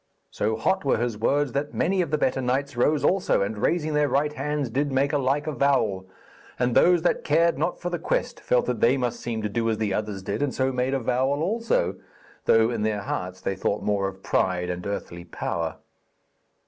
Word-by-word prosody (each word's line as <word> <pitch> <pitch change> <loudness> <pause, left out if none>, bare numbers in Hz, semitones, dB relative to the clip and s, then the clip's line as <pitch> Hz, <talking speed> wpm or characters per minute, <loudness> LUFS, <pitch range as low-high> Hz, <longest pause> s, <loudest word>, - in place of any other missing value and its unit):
So 110 +1 -1
hot 190 +11 +1
were 140 - +2
his 120 0 -1
words 140 +5 +1
that 140 +3 -3
many 190 0 +1
of 170 - -2
the 155 - +1
better 130 -2 0
knights 135 +2 -1
rose 145 +5 +2
also, 185 - +2
and 105 +1 -4
raising 155 +4 0
their 150 -1 +2
right 150 +2 +1
hands 145 -2 -2
did 140 +4 0
make 140 +2 +1
a 145 - +2
like 140 +2 0
avowal; 130 -11 +1 0.5
and 125 -1 +1
those 175 +3 +5
that 175 - +1
cared 165 +3 +2
not 175 - -1
for 175 - -4
the 175 - -2
quest - - -1
felt - - +1
that - - -2
they 125 +4 +4
must 125 -2 -2
seem 115 -2 -4
to - - +1
do 115 +2 0
as 110 - 0
the 105 -3 -1
others 105 -2 -3
did, - - -3
and 145 -2 -1
so 130 0 +1
made 130 +1 0
avowal 130 +4 0
also, 225 - 0 0.5
though 115 +1 +4
in 115 -3 -2
their 105 -1 0
hearts 90 -1 -4
they 95 - -2
thought 100 +2 -1
more 100 -2 +1
of 95 0 -9
pride 90 -1 0
and 90 +2 -5
earthly 85 -3 -5
power. 85 -1 -3
130 Hz, 210 wpm, -25 LUFS, 105-150 Hz, 0.5 s, those